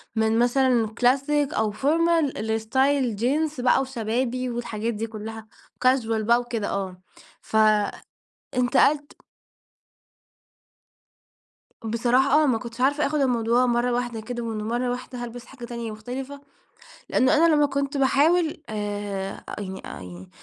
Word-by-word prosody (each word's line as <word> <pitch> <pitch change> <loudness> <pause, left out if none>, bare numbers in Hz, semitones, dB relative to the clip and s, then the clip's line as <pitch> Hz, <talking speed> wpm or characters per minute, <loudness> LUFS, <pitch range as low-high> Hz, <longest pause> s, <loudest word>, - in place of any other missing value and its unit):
من 220 0 +2
مثلًا 245 -1 +3
كلاسيك 270 +6 +1
أو 215 -1 0
formal 320 +2 +1
لاستايل 230 +4 +1
جينز 280 +6 0
بقى 255 +2 +4
وشبابي، 250 0 -2
والحاجات 235 -1 -3
دي 225 +1 -3
كلها 220 0 -8 0.3
وكاجوال 230 -4 +1
بقى 235 +3 +4
وكده، 235 -4 -3
آه، 185 -2 -4 1.3
فانتقلت 280 +3 +1 2.6
بصراحة، 250 +6 +3
آه، - - +3
ما 255 -5 +2
كنتش 235 +1 -8
عارفة 285 +3 +2
أخد 300 +1 -1
الموضوع 245 -2 +2
مرة 240 0 +1
واحدة 240 -2 -2
كده، 240 +1 -5
ومن 220 -2 -4
مرة 240 +3 -1
واحدة 250 0 -6
هالبس 240 0 -8
حاجة 255 -3 -10
تانية 235 -2 -5
مختلفة، 255 +6 -7 0.7
لأنه 260 0 +3
أنا 325 0 +5
لما 295 0 +4
كنت 280 0 -2
باحاول، 310 +5 +3
آآ، 205 -2 -4 0.2
يعني 190 -2 -6
يعني 90 +1 -9
245 Hz, 125 wpm, -24 LUFS, 220-270 Hz, 2.6 s, أنا